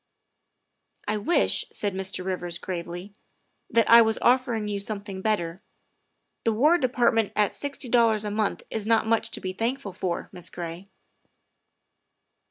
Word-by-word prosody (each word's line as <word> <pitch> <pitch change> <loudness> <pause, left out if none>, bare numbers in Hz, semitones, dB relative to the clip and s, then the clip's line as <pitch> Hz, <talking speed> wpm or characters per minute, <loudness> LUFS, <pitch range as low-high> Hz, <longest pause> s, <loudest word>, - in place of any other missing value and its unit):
' - - -53
' - - -53
' - - -52
' - - -34
I 210 +1 0
wish, 215 +12 +2
' - - -31
' - - -35
said 205 -2 -3
Mr. 190 -1 -3
Rivers 180 -2 -3
gravely, 175 +2 -6 0.2
' - - -46
' - - -48
that 230 0 +3
I 235 0 +9
was 220 -1 +2
offer 250 -1 +3
ing 215 -1 -2
you 205 -1 -2
something 200 -2 -5
better. 190 -5 -1 0.8
The 225 - +2
War 300 +10 +4
Department 240 -4 +2
at 210 -2 +2
sixty 285 -2 -5
dollars 230 -3 +3
a 210 - -2
month 215 -1 -1
is 220 -1 -3
not 225 -1 +3
much 225 0 +1
to - - -6
be 185 0 -4
thankful 230 0 -2
for, 180 -1 -3
Miss 180 0 -6
Gray." 175 +2 -7
210 Hz, 185 wpm, -26 LUFS, 190-230 Hz, 0.8 s, I